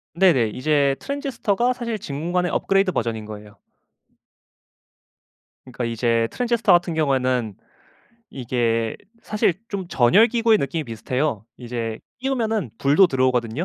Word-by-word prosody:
네네. 170 -11 +4
이제 140 +3 +1
트랜지스터가 250 -4 -1
사실 235 -3 -4
진공관의 175 +5 -2
업그레이드 195 -1 +1
버전인 115 -7 -3
거예요. 105 -1 -11 2.1
그러니까 125 -2 -5
이제 115 0 0
트랜지스터 235 -4 +1
같은 175 -1 +3
경우에는 130 -8 0 0.8
이게 115 -3 -1 0.3
사실 210 -4 +1
좀 195 -5 -5
전열 180 - +4
기구의 230 -1 +3
느낌이 145 +3 -2
비슷해요. 120 0 -2
이제 115 -2 -5 0.2
끼우면은 225 - -1
불도 145 +8 +5
들어오거든요. 130 -1 0
140 Hz, 330 characters per minute, -22 LUFS, 120-200 Hz, 2.1 s, 불도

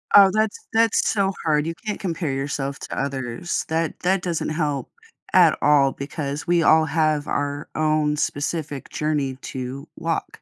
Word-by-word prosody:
Oh, 200 -1 +9
that's 215 -1 +1 0.2
that's 225 -1 +3
so 195 -2 +2
hard. 150 -1 +2
You 165 - -2
can't 210 - -3
compare 165 -5 -2
yourself 140 0 -3
to - - -6
others. 135 +3 -3
That 160 0 -1
that 185 0 +1
doesn't 170 -4 -2
help 150 -3 -2 0.4
at 175 -4 +6
all 140 -2 +5
because 145 +1 -5
we 175 -1 +3
all 160 0 +5
have 155 -1 +1
our 145 0 -2
own 155 -1 +1
specific 145 -1 -3
journey 145 -4 -1 0.2
to 130 +3 -5
walk. 165 -1 -3
155 Hz, 155 wpm, -23 LUFS, 140-170 Hz, 0.4 s, Oh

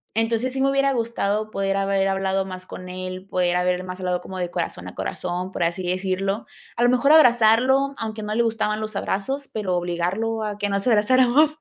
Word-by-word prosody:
entonces, 225 +3 +1
sí 265 - -4
me 270 +1 +3
hubiera 275 0 +2
gustado, 215 -3 -1
poder 195 -2 -1
haber 195 0 +1
hablado 195 0 0
más 185 -1 -8
con 180 0 -9
él. 185 0 -6
Poder 180 -1 +1
haber 180 0 0
más 185 0 -7
hablado 180 -1 0
como 190 - -8
de 175 -1 -3
corazón 165 - -4
a - - -14
corazón, 180 - -4
por - - -1
así 170 +2 -1
decirlo. 190 +3 -1 0.3
A 235 - 0
lo 245 - +5
mejor 255 +4 +4
abrazarlo, 255 0 +5
aunque 220 -1 -5
no 210 0 -3
le 235 - +3
gustaban 220 -2 -1
los 215 -1 -4
abrazos, 265 +10 -3
pero 190 -4 -1
obligarlo, 180 +6 -1
a 210 -1 -4
que 205 - -1
nos 200 0 -1
abrazáramos. 255 +7 +4
200 Hz, 200 wpm, -23 LUFS, 185-235 Hz, 0.3 s, lo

